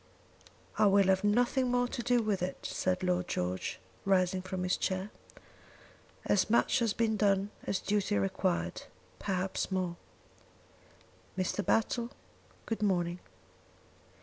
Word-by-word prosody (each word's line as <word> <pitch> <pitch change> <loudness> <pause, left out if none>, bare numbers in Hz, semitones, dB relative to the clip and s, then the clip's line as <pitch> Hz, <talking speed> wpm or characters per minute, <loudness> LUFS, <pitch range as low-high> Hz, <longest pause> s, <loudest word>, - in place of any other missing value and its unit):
"I 210 - +6
will 195 -1 +4
have 190 0 +3
nothing 245 +4 +2
more 245 0 +2
to 240 - -3
do 240 0 +2
with 205 -4 0
it," 180 +1 -4
said 185 0 -1
Lord 180 0 +1
George, 90 +1 -2 0.2
rising 185 -1 +2
from 185 0 -4
his 180 - +1
chair. 190 +2 -2 1.1
"As 200 0 +2
much 235 +3 +3
has 230 -3 +1
been 220 0 +1
done 200 -1 +2 0.2
as 195 - +1
duty 205 - 0
required; 85 -3 -1 0.4
perhaps 190 -1 -1
more. 180 -2 -1 1.4
Mr. 185 +2 -1
Battle, 235 +3 +1 0.6
good 225 -1 -3
morning. 175 -3 +1
195 Hz, 125 wpm, -31 LUFS, 180-215 Hz, 1.4 s, I